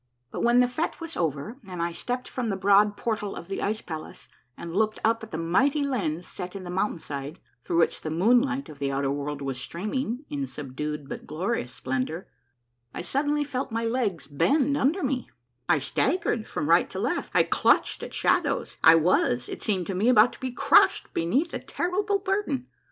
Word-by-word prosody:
But -, -, -4 dB
when 240 Hz, +1 st, +5 dB
the 250 Hz, -, +4 dB
fete 280 Hz, +7 st, -3 dB
was 330 Hz, -1 st, -6 dB
over 160 Hz, -, -2 dB
and 180 Hz, -2 st, -7 dB
I 170 Hz, 0 st, 0 dB
stepped 250 Hz, +8 st, -3 dB
from 245 Hz, -3 st, -3 dB
the 195 Hz, -, -1 dB
broad 205 Hz, +2 st, +4 dB
por 225 Hz, 0 st, -1 dB
tal 205 Hz, -2 st, -5 dB
of 170 Hz, -, -8 dB
the 195 Hz, -, -4 dB
ice 215 Hz, +2 st, -1 dB
palace 160 Hz, -2 st, -8 dB, 0.3 s
and 170 Hz, 0 st, -7 dB
looked 215 Hz, +1 st, +1 dB
up 225 Hz, +1 st, +2 dB
at 220 Hz, -, -9 dB
the 160 Hz, -, -4 dB
mighty 265 Hz, -, +2 dB
lens 180 Hz, -, -1 dB
set 180 Hz, +2 st, -7 dB
in 195 Hz, -, -6 dB
the 175 Hz, -, -6 dB
mountain 190 Hz, 0 st, 0 dB
side, 145 Hz, 0 st, -6 dB, 0.2 s
through 170 Hz, -, -1 dB
which 170 Hz, -, +2 dB
the 155 Hz, -, -4 dB
moonlight 245 Hz, -, +2 dB
of 150 Hz, -, -12 dB
the 140 Hz, -1 st, -1 dB
outer 135 Hz, 0 st, 0 dB
world 145 Hz, 0 st, -3 dB
was 135 Hz, -2 st, -3 dB
streaming 230 Hz, -, -3 dB
in 140 Hz, -2 st, -3 dB
subdued 145 Hz, +2 st, -5 dB
but -, -, -7 dB
glorious 165 Hz, -, -2 dB
splendor, 130 Hz, +7 st, -3 dB, 0.7 s
I -, -, -3 dB
suddenly 290 Hz, +10 st, 0 dB
felt 265 Hz, -3 st, -4 dB
my 230 Hz, +1 st, -1 dB
legs 225 Hz, -, -1 dB
bend 280 Hz, -, +2 dB
under 300 Hz, +7 st, +1 dB
me, 260 Hz, -2 st, -1 dB, 0.4 s
I 175 Hz, -, +5 dB
staggered 275 Hz, -, 0 dB
from -, -, -3 dB
right -, -, +4 dB
to -, -, -7 dB
left, -, -, -1 dB
I -, -, +6 dB
clutched -, -, +2 dB
at -, -, -6 dB
shadows, -, -, +1 dB
I 160 Hz, -, +9 dB
was, 155 Hz, -7 st, +2 dB
it -, -, -6 dB
seemed 190 Hz, -5 st, 0 dB
to 195 Hz, -, -3 dB
me, 205 Hz, +6 st, +2 dB
about 240 Hz, -1 st, +6 dB
to -, -, -13 dB
be 260 Hz, -, -3 dB
crushed 240 Hz, -, +4 dB
beneath 265 Hz, -, 0 dB
a -, -, -2 dB
terrible 400 Hz, +3 st, -1 dB
burden. 385 Hz, -10 st, -1 dB
200 Hz, 200 wpm, -26 LUFS, 160-255 Hz, 0.7 s, I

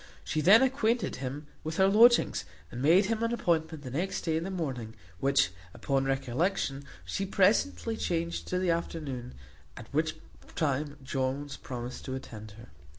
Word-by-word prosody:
She 155 Hz, -, -1 dB
then 210 Hz, -, +7 dB
acquainted 250 Hz, -3 st, +1 dB
him 135 Hz, +3 st, -5 dB, 0.2 s
with 155 Hz, +1 st, -4 dB
her 190 Hz, -, +5 dB
lodgings, 230 Hz, -, +5 dB, 0.3 s
and 120 Hz, -, -5 dB
made 170 Hz, +8 st, +5 dB
him 225 Hz, +2 st, -1 dB
an 230 Hz, 0 st, +1 dB
appointment 160 Hz, -8 st, 0 dB
the 130 Hz, -, -7 dB
next 185 Hz, +8 st, -2 dB
day 160 Hz, -2 st, 0 dB
in 160 Hz, -, 0 dB
the 190 Hz, -, -4 dB
morning; 130 Hz, -, -4 dB, 0.2 s
which, 135 Hz, -7 st, +3 dB, 0.2 s
upon 135 Hz, -1 st, 0 dB
recollection, 135 Hz, +2 st, -1 dB, 0.2 s
she 195 Hz, -, -2 dB
presently 195 Hz, -, +2 dB
changed 170 Hz, -4 st, -2 dB
to 180 Hz, -, -1 dB
the 180 Hz, -1 st, +1 dB
afternoon; 150 Hz, -, -4 dB, 0.4 s
at 115 Hz, +2 st, -11 dB
which 155 Hz, +1 st, +1 dB, 0.4 s
time 145 Hz, -1 st, -1 dB
Jones 135 Hz, +2 st, -2 dB
promised 125 Hz, -2 st, -7 dB
to 130 Hz, -, -3 dB
attend 110 Hz, -5 st, -8 dB
her. 115 Hz, +1 st, -13 dB
155 Hz, 160 wpm, -29 LUFS, 135-185 Hz, 0.4 s, then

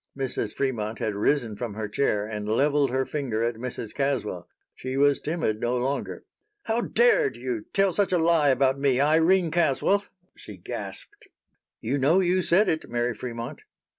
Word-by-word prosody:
Mrs. 130 Hz, -5 st, -3 dB
Fremont 115 Hz, -5 st, -2 dB
had 110 Hz, -, -2 dB
risen 110 Hz, +2 st, 0 dB
from 110 Hz, -1 st, -5 dB
her 110 Hz, 0 st, -3 dB
chair 105 Hz, -2 st, 0 dB
and 105 Hz, -1 st, -5 dB
leveled 140 Hz, +5 st, +2 dB
her 130 Hz, +1 st, 0 dB
finger 130 Hz, -7 st, -2 dB
at 120 Hz, +1 st, 0 dB
Mrs. 115 Hz, -2 st, -6 dB
Caswell. 125 Hz, -11 st, -2 dB, 0.2 s
She 130 Hz, +1 st, -5 dB
was 145 Hz, 0 st, +4 dB
timid 155 Hz, -10 st, -2 dB
no 120 Hz, +1 st, 0 dB
longer. 135 Hz, +3 st, -3 dB, 0.4 s
"How 225 Hz, +2 st, 0 dB
dared 470 Hz, -, +3 dB
you 340 Hz, -4 st, -4 dB
tell 195 Hz, -2 st, +2 dB
such 200 Hz, +1 st, +1 dB
a 180 Hz, -, +3 dB
lie 165 Hz, -3 st, +3 dB
about 135 Hz, 0 st, +2 dB
me, 135 Hz, -2 st, +2 dB
Irene 165 Hz, +4 st, +3 dB
Caswell?" 170 Hz, +5 st, +2 dB, 0.3 s
she -, -, -11 dB
gasped. 410 Hz, +1 st, -8 dB, 0.5 s
"You 130 Hz, +5 st, -1 dB
know 155 Hz, +8 st, +4 dB
you 185 Hz, 0 st, +2 dB
said 185 Hz, +4 st, +3 dB
it, 160 Hz, -, -1 dB
Mary 120 Hz, 0 st, -1 dB
Fremont." 115 Hz, +1 st, -6 dB
135 Hz, 165 wpm, -25 LUFS, 115-170 Hz, 0.5 s, was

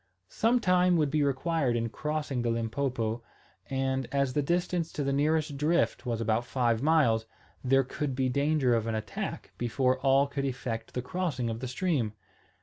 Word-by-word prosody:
Some 235 Hz, +3 st, +2 dB
time 180 Hz, -3 st, +3 dB
would 150 Hz, -3 st, +1 dB
be 155 Hz, 0 st, +2 dB
required 140 Hz, -1 st, +1 dB
in 115 Hz, 0 st, -1 dB
crossing 150 Hz, +1 st, -2 dB
the 120 Hz, -, 0 dB
Limpopo, 115 Hz, 0 st, -1 dB, 0.5 s
and, 135 Hz, -1 st, -1 dB
as 140 Hz, -2 st, +1 dB
the 145 Hz, -, +2 dB
distance 175 Hz, +2 st, 0 dB
to 145 Hz, -, -2 dB
the 140 Hz, 0 st, 0 dB
nearest 150 Hz, 0 st, +1 dB
drift 150 Hz, -2 st, +1 dB
was 115 Hz, -2 st, -1 dB
about 115 Hz, +1 st, +1 dB
five 120 Hz, -2 st, 0 dB
miles, 135 Hz, -8 st, +3 dB, 0.4 s
there 135 Hz, +1 st, +4 dB
could 135 Hz, +1 st, -3 dB
be 130 Hz, 0 st, +1 dB
danger 140 Hz, 0 st, +2 dB
of 115 Hz, -1 st, 0 dB
an 115 Hz, -, -1 dB
attack 110 Hz, -2 st, -5 dB
before 130 Hz, +2 st, +1 dB
all 135 Hz, +1 st, +4 dB
could 140 Hz, 0 st, -3 dB
effect 125 Hz, -4 st, -4 dB
the 125 Hz, -, -2 dB
crossing 140 Hz, -7 st, -2 dB
of 110 Hz, -, -5 dB
the 130 Hz, -, -4 dB
stream. 125 Hz, -, -1 dB
135 Hz, 175 wpm, -29 LUFS, 120-150 Hz, 0.5 s, there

